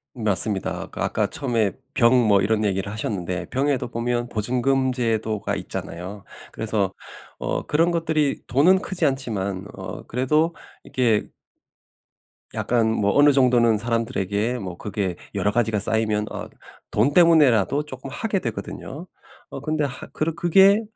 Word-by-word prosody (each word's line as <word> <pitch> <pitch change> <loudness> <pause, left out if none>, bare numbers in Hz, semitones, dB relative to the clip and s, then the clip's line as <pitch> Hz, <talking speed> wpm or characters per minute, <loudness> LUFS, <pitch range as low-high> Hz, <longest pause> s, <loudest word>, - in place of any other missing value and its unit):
맞습니다. 105 -3 +2
아까 - - -5
아까 105 -2 0
처음에 120 -9 0 0.2
병 115 -1 +5 0.2
뭐 100 -2 +4
이런 110 0 +1
얘기를 95 0 -1
하셨는데 95 -4 -3
병에도 135 -2 0
보면 120 +1 -2
보증금 130 +4 +1
제도가 110 -3 -1
있잖아요. 90 +4 -6 0.3
그래서 105 -4 -1 0.5
어 - - -2
그런 165 +3 +2
것들이 160 -4 0
돈은 175 +9 +4
크지 185 -4 -2
않지만 100 -9 -2
어 - - -8
그래도 150 +7 +1 0.3
이게 120 -5 0 1.3
약간 115 -2 +1
뭐 100 -2 +1
어느 145 +1 +6
정도는 125 -4 +4
사람들에게 115 0 -1
뭐 90 -3 -6
그게 95 -3 -3 0.2
여러 105 - +1
가지가 110 -1 +1
쌓이면 110 0 +1
어 - - -6 0.4
돈 120 +8 +2
때문에라도 150 - +4
쪼끔 130 -2 -9
하게 210 -3 -1
되거든요. 130 - -6 0.5
어 - - -6
근데 155 0 -1
하 135 -3 -5
그러 160 +1 -1
그게 195 +5 +5
120 Hz, 305 characters per minute, -23 LUFS, 105-145 Hz, 1.3 s, 어느